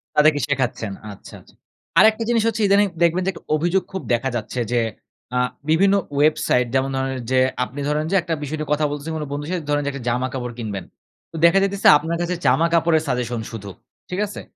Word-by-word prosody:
তাদেরকে 150 0 +4
শেখাচ্ছেন 130 -6 -1 0.2
আচ্ছা, 100 - -13
আচ্ছা। - - -22 0.5
আরেকটা 220 +1 +5
জিনিস 230 -2 +2
হচ্ছে 225 -1 -1
ইদানিং 200 +1 +4 0.2
দেখবেন 170 +2 +3
যে - - +1
একটু - - -13
অভিযোগ 175 +4 +1
খুব 190 -1 -4
দেখা 120 +3 0
যাচ্ছে 120 +2 -4
যে 120 - +3 0.6
আ - - +2 0.3
বিভিন্ন 195 +5 +4 0.2
ওয়েবসাইট 145 -4 +2
যেমন 135 +1 +1
ধরেন 135 0 -1 0.2
যে, 130 - +4 0.2
আপনি 130 +3 -7
ধরেন 150 +1 0
যে - - +2
একটা 170 -1 -3
বিষয় 150 +2 -4
নিয়ে 150 -1 -4
কথা 150 +1 +1
বলতেছে 145 +2 -5
কোনো 150 -1 -4
বন্ধুর 145 +1 -4
সাথে, 180 -3 -2
ধরেন 145 0 +2
যে - - 0
একটা 140 -2 -7
জামা-কাপড় 125 0 -2
কিনবেন। 100 -5 -5 0.5
তো - - -12
দেখা 170 +3 +6
যাইতেসে 195 0 +3
আপনার 165 +3 -3
কাছে 175 +1 -1
জামা 145 +7 +4
কাপড়ের 165 -1 +3
সাজেশন 125 -3 -2
শুধু, 100 -3 -7 0.4
ঠিক 180 - -3
আছে? 205 - -8
150 Hz, 200 wpm, -21 LUFS, 130-175 Hz, 0.6 s, দেখা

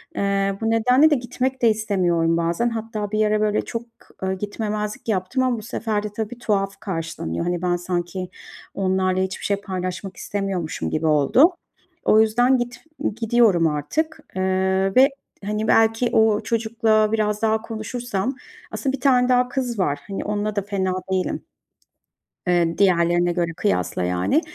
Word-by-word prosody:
Eee, 195 0 0
bu 225 - 0
nedenle 250 +7 +4
de 300 - +4
gitmek 255 +1 -2
de 235 - +5
istemiyorum 180 -6 +1
bazen. 170 +8 0
Hatta 220 -2 -4
bir 215 0 +2
ara 210 0 +1
böyle, 215 0 +1
ııı, - - -1
çok 230 0 -4 0.6
gitmemezlik 210 +1 -4
yaptım 215 +5 0
ama 255 -2 +1
bu 215 - -6
sefer 215 -1 -2
de - - -2
tabii, 220 +2 -4
tuhaf 195 -4 -1
karşılanıyor. 165 - -4
Hani, 175 0 -1
ben 180 -1 +1
sanki 175 +1 -3 0.4
onlarla 185 -1 +1
hiçbir 190 0 -5
şey 200 - +1
paylaşmak 185 -1 -5
istemiyormuşum 195 -5 -3
gibi 155 +1 -1
oldu. 155 - +4 0.5
O 220 - +6
yüzden 245 +4 +3
git 245 0 -5 0.3
gidiyorum 225 -7 +3
artık, 305 - -2 0.2
eee, 190 +1 +1
ve, 265 +3 +7 0.4
hani, 210 +1 -2
belki 225 +2 +3
o 220 -1 +3
çocukla 220 -1 +1
biraz 210 -1 0
daha 220 0 +2
konuşursam 230 +1 -3 0.4
aslında 270 -2 -2
1 275 - -12
tane 250 -2 +4
daha 250 0 +4
kız 250 -5 -2
var, 145 -6 0
hani, 195 -1 -4
onunla 210 0 -2
da 200 - +1
fena 190 -2 -1 0.2
değilim. 185 -1 -1 1.0
Eee, 170 -2 +1
diğerlerine 175 -2 +3
göre 170 -1 -1
kıyasla 90 -1 0
yani. 90 - +1
210 Hz, 155 wpm, -22 LUFS, 185-230 Hz, 1.0 s, ve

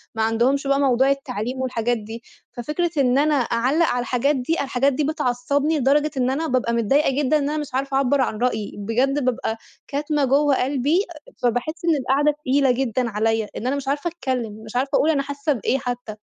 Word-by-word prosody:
ما 220 - 0
عندهمش 250 +5 +1
بقى 275 0 +2
موضوع 265 -1 +3
التعليم 260 -3 -2
والحاجات 240 -2 -1
دي، 225 +2 -9 0.3
ففكرة 300 +8 -2
إن 260 -2 +3
أنا 300 +1 +3
أعلّق 260 +5 +1
على 245 - 0
الحاجات 260 +4 +1
دي، 265 +5 -1
الحاجات 275 0 +1
دي 295 +3 -1
بتعصّبني 285 +1 0
لدرجة 290 +3 +2
إن 250 0 +1
أنا 300 +5 -1
بابقى 250 -4 0
متضايقة 270 +6 +2
جدًا 295 +1 +2
إن 285 -1 -1
أنا 305 - -2
مش 295 -3 -5
عارفة 270 +1 -1
أعبّرعن 265 -4 +1
رأيي، 220 -4 -2
بجد 250 +7 0
بابقى 245 -3 -1 0.3
كاتمة 295 0 0
جوّه 280 +2 +3
قلبي، 285 +8 +1 0.4
فباحس 245 +8 -1
إن 330 -2 +3
القعدة 275 +3 +2
تقيلة 280 -2 +1
جدًا 250 -1 -1
عليّا، 220 +1 0
إن 245 - -4
أنا 275 - +1
مش 275 -1 -5
عارفة 285 +4 -1
أتكلّم 250 -9 -4
مش 220 - -11
عارفة 260 +2 0
أقول 310 - +2
أنا 290 -3 +2
حاسّة 285 +2 -1
بإيه 255 +2 0
حتّى. 245 -4 -5
265 Hz, 190 wpm, -22 LUFS, 245-285 Hz, 0.4 s, موضوع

